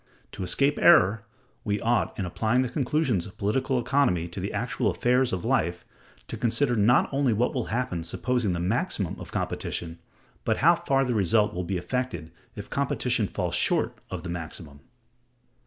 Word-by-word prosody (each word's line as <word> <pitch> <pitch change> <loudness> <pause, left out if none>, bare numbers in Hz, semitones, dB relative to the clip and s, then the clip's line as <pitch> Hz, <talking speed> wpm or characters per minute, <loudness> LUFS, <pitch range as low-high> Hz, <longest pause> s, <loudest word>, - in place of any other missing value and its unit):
To - - -8
escape 140 +11 +1
error, 110 - +6 0.4
we 105 -1 -1
ought, 115 +1 0
in 95 - -2
applying 110 +8 +1
the 125 - -3
conclusions 130 - 0
of 105 +2 -14
political 130 +6 0
economy 120 -10 +1
to 85 - -7
the 95 +3 -3
actual 120 +4 -1
affairs 125 +1 +2
of 90 -2 -3
life, 85 +2 0 0.4
to - - -6
consider 120 +2 +1
not 115 +4 +4
only 135 -4 +2
what 120 +4 +1
will 125 -4 -2
happen 115 -8 -2
supposing 115 +4 -1
the 85 - -2
maximum 100 - -1
of - - -9
competition, 85 -1 -3 0.4
but - - +1
how - - +6
far 135 0 +1
the 125 - -1
result 105 +1 +2
will 90 -1 -3
be 95 +1 -2
affected 90 -4 -3 0.2
if - - -7
competition - - 0
falls - - -3
short - - +1
of - - -5
the 90 - -6
maximum. 80 -4 -7
110 Hz, 170 wpm, -26 LUFS, 90-125 Hz, 0.4 s, error